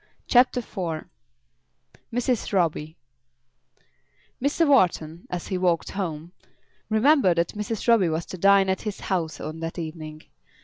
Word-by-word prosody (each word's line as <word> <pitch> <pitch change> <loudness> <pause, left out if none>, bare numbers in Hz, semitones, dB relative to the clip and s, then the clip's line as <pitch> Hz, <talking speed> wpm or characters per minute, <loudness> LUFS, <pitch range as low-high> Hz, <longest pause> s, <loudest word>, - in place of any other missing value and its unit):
CHAPTER 250 0 +4
IV 170 -8 -5 1.1
Mrs. 245 0 -1
Roby 165 -4 0 1.5
Mr. 290 +4 +2
Wharton, 170 - +2
as 180 -1 -5
he 185 - -1
walked 175 -2 +1
home, 170 -4 -4 0.6
remembered 220 - +4
that 170 - +1
Mrs. 210 +2 -4
Roby 225 -7 +5
was 160 +1 -2
to 185 - -8
dine 195 +1 +5
at 190 0 0
his 210 -2 -5
house 170 -5 -2
on 155 +1 -6
that 165 +1 -5
evening. 155 -2 -7
185 Hz, 130 wpm, -25 LUFS, 165-215 Hz, 1.5 s, Roby